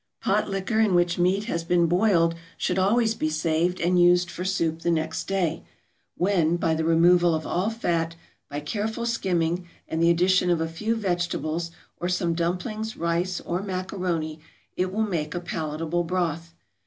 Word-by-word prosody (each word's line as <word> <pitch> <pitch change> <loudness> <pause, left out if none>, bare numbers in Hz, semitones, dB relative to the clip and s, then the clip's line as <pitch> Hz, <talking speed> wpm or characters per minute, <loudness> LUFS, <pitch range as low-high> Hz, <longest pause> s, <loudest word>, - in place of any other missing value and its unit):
Pot - - +1
liquor 195 +3 -1
in 210 -5 +3
which 175 0 +2
meat 185 +3 +2
has 170 -6 -2
been 170 0 +3
boiled 175 -1 +3 0.2
should 185 0 0
always 220 +4 +3
be 155 -8 -1
saved 160 +3 0
and 175 +1 +3
used 175 0 +4
for 180 - -5
soup 170 -4 0
the 170 - -1
next 160 -1 -1
day, 175 -5 -1 0.5
when 175 -3 +2
by 165 -1 +1
the 160 0 -1
removal 170 +1 +4
of 155 - -4
all 185 +5 0
fat, 170 -7 -1 0.3
by 145 - -4
careful 215 +9 -3
skimming, 175 -6 0 0.2
and 160 - -2
the 170 - +5
addition 180 +1 +3
of 175 -2 +2
a 165 - 0
few 215 +8 -2
vegetables 175 -4 -2 0.3
or 175 - -2
some 180 -2 0
dumplings, 185 +6 -2
rice, 170 +2 -1
or 175 +2 -2
macaroni, 180 -5 -3 0.4
it 185 0 -1
will 220 +3 0
make 165 -7 -2
a - - -1
palatable 165 0 -2
broth. 165 -1 -2
175 Hz, 170 wpm, -25 LUFS, 165-185 Hz, 0.5 s, the